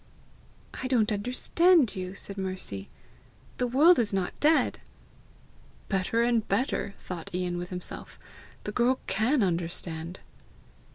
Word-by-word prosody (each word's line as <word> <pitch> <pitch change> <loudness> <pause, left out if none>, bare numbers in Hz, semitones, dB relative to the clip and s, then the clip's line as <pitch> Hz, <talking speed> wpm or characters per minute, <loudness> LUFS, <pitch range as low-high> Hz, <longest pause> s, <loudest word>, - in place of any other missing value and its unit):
"I 260 - -2
don't 230 -4 +2
understand 255 - +3
you," 185 0 -5
said 200 - -6
Mercy. 185 - -4 0.7
"The 250 - 0
world 300 +8 +6
is 225 -3 +2
not 190 -2 -1
dead!" 310 +2 +3 1.1
"Better 195 +4 +1
and 235 -2 +1
better!" 200 -2 -1
thought 175 -3 -7
Ian 180 -1 -1
with 175 0 -6
himself. 180 -1 -7 0.5
"The 210 - -4
girl 245 +4 +2
CAN 220 +6 +2
understand! 170 -1 -2
200 Hz, 120 wpm, -28 LUFS, 180-250 Hz, 1.1 s, world